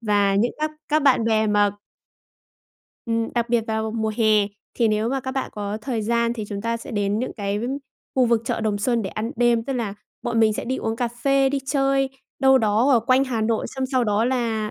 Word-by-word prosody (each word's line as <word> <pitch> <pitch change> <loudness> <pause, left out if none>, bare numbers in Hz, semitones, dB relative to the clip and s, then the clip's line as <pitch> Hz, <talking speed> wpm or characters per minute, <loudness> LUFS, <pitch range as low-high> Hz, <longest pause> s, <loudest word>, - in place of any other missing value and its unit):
và 205 -3 +2
những 230 +5 +2
các 310 0 0 0.2
các 305 0 +2
bạn 260 -5 +4
bè 220 -1 +2
mà 205 -1 +3 1.4
Ừm, 230 0 0
đặc 235 0 0
biệt 235 -2 +1
vào 220 0 -1
mùa 220 -1 -1
hè 215 -3 +4 0.3
thì 230 -2 +2
nếu 215 +1 +1
mà 270 +1 -1
các 260 - -4
bạn 265 0 -3
có 205 0 -4
thời 230 -2 -2
gian 235 +2 +1
thì 220 -3 -5
chúng 200 -1 -4
ta 230 +2 -1
sẽ 265 +4 -9
đến 205 -1 0
những 255 - -3
cái 200 -1 -2 0.5
khu 255 -2 +4
vực 230 -1 +2
chợ 230 - -2
Đồng 215 -2 0
Xuân 235 +2 +1
để 190 - -4
ăn 220 +2 -4
đêm, 240 -1 +2
tức 270 - -3
là 230 -6 -2 0.3
bọn 235 -1 0
mình 220 -1 +4
sẽ - - -4
đi 260 +2 -2
uống 225 0 -2
cà 240 0 0
phê, 270 +3 +2
đi 280 - 0
chơi 270 -1 +1 0.3
đâu 265 0 +6
đó 225 +4 +2
ở 240 - +5
quanh 255 +4 +3
Hà 240 -4 -2
Nội 220 0 0
xong 265 -1 -3
sau 255 -2 +1
đó 210 +1 +1
là, 230 -4 -1
230 Hz, 235 wpm, -23 LUFS, 215-255 Hz, 1.4 s, đâu